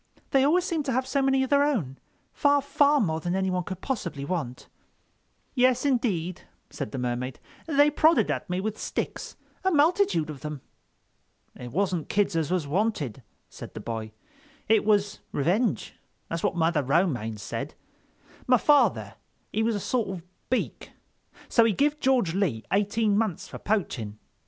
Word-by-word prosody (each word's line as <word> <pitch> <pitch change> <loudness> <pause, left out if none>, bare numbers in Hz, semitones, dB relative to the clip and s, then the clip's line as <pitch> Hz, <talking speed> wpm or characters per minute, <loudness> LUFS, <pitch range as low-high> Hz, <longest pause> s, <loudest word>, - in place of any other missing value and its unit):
They 270 -1 +4
always 340 +6 +3
seem 330 -4 -1
to 280 -2 -2
have 260 +1 0
so 275 +1 0
many 270 0 +3
of 265 - -4
their 285 0 +5
own—far, 285 - -1
far 290 0 +3
more 160 -8 0
than 175 +3 -2
anyone 190 -1 0
could 185 +1 -7
possibly 170 - -3
want." 145 -8 -4 0.9
"Yes, 255 0 +3
indeed," 195 - 0 0.3
said - - -5
the - - -5
Mermaid, 125 0 -3 0.3
"they 290 -1 +4
prodded 315 +2 +4
at - - -4
me 180 +1 -1
with 215 +1 -3
sticks—a 380 - -4
multitude 305 - +2
of 145 - -9
them." 150 -3 -6 0.9
"It 125 -1 -8
wasn't 180 -1 -1
kids 205 -3 +1
as 160 -2 0
was 180 -4 0
wanted," 150 - -1 0.3
said - - -11
the - - -5
boy, 110 -1 -5 0.6
"it 220 0 +4
was 205 -1 +2
revenge. 190 - 0 0.4
That's 165 0 -3
what 205 - 0
Mother 165 -2 +2
Romaine 135 - 0
said—my 250 - -4
father 290 +5 +3 0.4
he 220 - +1
was 225 0 +1
a - - -1
sort 230 0 -1
of 185 -3 -6 0.3
Beak, 255 - -2 0.5
so 230 - +4
he 225 -2 +3
give 295 +6 +1
George 255 - +2
Lee 170 - 0
eighteen 205 +1 +2
months 210 -6 -1
for - - -9
poaching. 125 - -2
200 Hz, 155 wpm, -26 LUFS, 160-265 Hz, 0.9 s, their